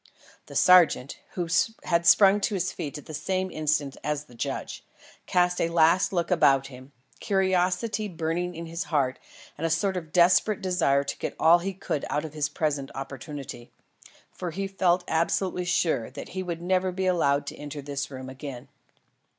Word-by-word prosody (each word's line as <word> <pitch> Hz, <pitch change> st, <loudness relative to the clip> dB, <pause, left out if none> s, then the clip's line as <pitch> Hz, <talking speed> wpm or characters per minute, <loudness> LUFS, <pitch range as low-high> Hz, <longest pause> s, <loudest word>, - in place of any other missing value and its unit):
The -, -, -11 dB
sergeant, 175 Hz, -7 st, +5 dB
who 175 Hz, -2 st, -2 dB, 0.4 s
had 170 Hz, -1 st, +1 dB
sprung 200 Hz, +3 st, +6 dB
to 205 Hz, -, 0 dB
his 185 Hz, 0 st, -1 dB
feet 150 Hz, -4 st, -6 dB
at 150 Hz, -, -11 dB
the 155 Hz, -, -9 dB
same 185 Hz, +4 st, -2 dB
instant 150 Hz, -3 st, -1 dB
as 150 Hz, -1 st, -2 dB
the 150 Hz, -, -19 dB
judge, 115 Hz, -, -5 dB, 0.4 s
cast 180 Hz, 0 st, +2 dB
a 165 Hz, -, +1 dB
last 165 Hz, +3 st, +3 dB
look 175 Hz, -1 st, -1 dB
about 135 Hz, -6 st, +4 dB
him, 130 Hz, +2 st, -13 dB, 0.3 s
curiosity 190 Hz, +2 st, 0 dB
burning 175 Hz, 0 st, -3 dB
in 165 Hz, +1 st, -6 dB
his 165 Hz, +3 st, -4 dB
heart 135 Hz, -5 st, 0 dB, 0.4 s
and 165 Hz, -, 0 dB
a -, -, -2 dB
sort 190 Hz, +4 st, 0 dB
of 165 Hz, -4 st, -5 dB
desperate 180 Hz, +4 st, +4 dB
desire 170 Hz, -7 st, +1 dB
to 140 Hz, -, -5 dB
get -, -, -4 dB
all 170 Hz, +2 st, +6 dB
he 190 Hz, +2 st, -4 dB
could 165 Hz, -6 st, -3 dB
out 150 Hz, +1 st, -1 dB
of 155 Hz, -, -8 dB
his 150 Hz, -1 st, -1 dB
present 145 Hz, -3 st, -2 dB
opportunity. 135 Hz, -2 st, -7 dB, 0.6 s
For 180 Hz, -, -5 dB
he 195 Hz, +4 st, -3 dB
felt 185 Hz, -2 st, +1 dB
absolutely 180 Hz, +2 st, 0 dB
sure 170 Hz, -9 st, 0 dB
that -, -, -9 dB
he 185 Hz, -, -4 dB
would 170 Hz, -2 st, -5 dB
never 185 Hz, +1 st, +1 dB
be 190 Hz, +1 st, -3 dB
allowed 145 Hz, -6 st, +2 dB
to -, -, -6 dB
enter 145 Hz, -1 st, -7 dB
this 140 Hz, 0 st, -4 dB
room 130 Hz, -1 st, -8 dB
again. 130 Hz, -1 st, -8 dB
170 Hz, 180 wpm, -26 LUFS, 145-185 Hz, 0.6 s, sprung